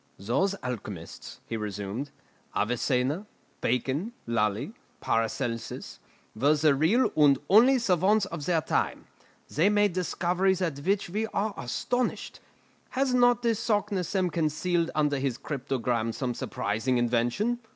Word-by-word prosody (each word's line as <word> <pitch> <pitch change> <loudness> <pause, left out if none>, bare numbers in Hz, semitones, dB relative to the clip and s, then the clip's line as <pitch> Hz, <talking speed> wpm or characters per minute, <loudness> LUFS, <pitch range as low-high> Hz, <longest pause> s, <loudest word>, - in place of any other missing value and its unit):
"Those 155 - 0
alchemists," 105 -9 -7
he 115 - -4
resumed, 105 +5 -4 0.5
"Avicenna, 125 - 0 0.3
Bacon, 135 - -1
Lully, 115 - 0 0.3
Paracelsus, 115 +1 -2 0.4
were 140 +7 +3
the 150 -1 +4
real 165 - +3
and 145 -3 +5
only 245 +6 +7
savants 200 -1 +2
of 170 -5 -6
their 170 -3 +2
time. - - -1 0.4
They 165 +8 +2
made 205 -2 +3
discoveries 180 +1 +1
at 165 -7 -2
which 195 +4 0
we 215 +3 -1
are 210 0 -1
astonished. 245 - -2 0.6
Has 265 -1 +2
not 245 -1 +4
this 230 -2 +1
Saknussemm 200 -5 0
concealed 165 +2 0
under 150 -2 +1
his 130 -3 -1
cryptogram 125 -5 -2
some 125 -2 -2
surprising 115 +3 -1
invention? 120 - +1
155 Hz, 120 wpm, -28 LUFS, 120-200 Hz, 0.6 s, only